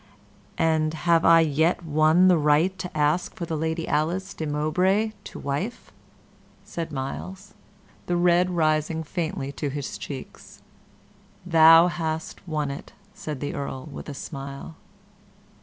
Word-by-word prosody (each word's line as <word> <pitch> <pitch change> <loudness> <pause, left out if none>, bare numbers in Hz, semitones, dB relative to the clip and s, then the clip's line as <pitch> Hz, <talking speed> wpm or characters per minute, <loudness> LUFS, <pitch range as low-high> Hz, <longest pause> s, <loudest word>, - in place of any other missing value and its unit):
"And 160 -1 +1
have 165 +1 +2
I 165 0 +7
yet 160 +3 +1
won 155 +4 +4
the 180 -3 +5
right 150 +5 +3
to 180 -4 -6
ask 150 +4 +1
for 170 - -4
the 165 - -3
Lady 160 +1 -2
Alice 175 +6 -1
de 160 - -4
Mowbray 180 +9 +1
to - - -9
wife?" 145 - -4 0.7
said 165 -1 -5
Myles, 185 +9 -6 0.5
the 175 - +1
red 175 +1 +3
rising 160 -1 0
faintly 155 -4 -3
to 145 0 -4
his 140 0 -5
cheeks. 135 -3 -9 0.8
"Thou 165 -1 +7
hast 160 0 -4
won 150 -3 -2
it," 140 - -9 0.2
said 150 -8 -6
the 145 - -3
Earl, 140 0 -5
with 140 - -8
a 145 - -6
smile. 140 +2 -7
160 Hz, 140 wpm, -25 LUFS, 150-175 Hz, 0.8 s, I